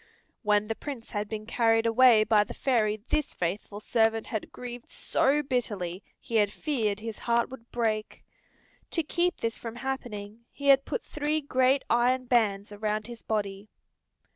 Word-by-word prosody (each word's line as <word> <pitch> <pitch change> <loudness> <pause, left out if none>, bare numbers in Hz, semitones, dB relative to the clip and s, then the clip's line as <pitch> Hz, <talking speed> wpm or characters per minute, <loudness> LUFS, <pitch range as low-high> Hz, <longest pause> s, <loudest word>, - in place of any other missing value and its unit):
When 210 -1 +2
the 225 - -1
Prince 255 -1 -7
had 205 -1 -3
been 215 -1 -5
carried 225 0 +2
away 230 -1 +6
by 215 -1 +4
the - - -9
fairy 215 -5 +1
this 305 - 0
faithful 200 +4 -3
servant 225 0 +1
had 220 - -4
grieved 245 -1 -8
so 290 +3 +1
bitterly 205 -9 -2 0.2
he 230 - -2
had 205 -2 +3
feared 220 -8 -1
his 225 -1 -6
heart 235 +1 +1
would 240 -3 -11
break. 220 -3 -2 0.7
To 330 - 0
keep 345 +4 0
this 230 -1 -2
from 230 -1 -6
happening 235 -4 -5
he 280 0 -2
had 275 0 +6
put - - -3
three 300 +1 -1
great 265 -1 +2
iron 250 +2 +2
bands 210 -5 +1
around 210 +1 -2
his 240 -1 -9
body. 205 -1 -3
230 Hz, 165 wpm, -28 LUFS, 210-255 Hz, 0.7 s, away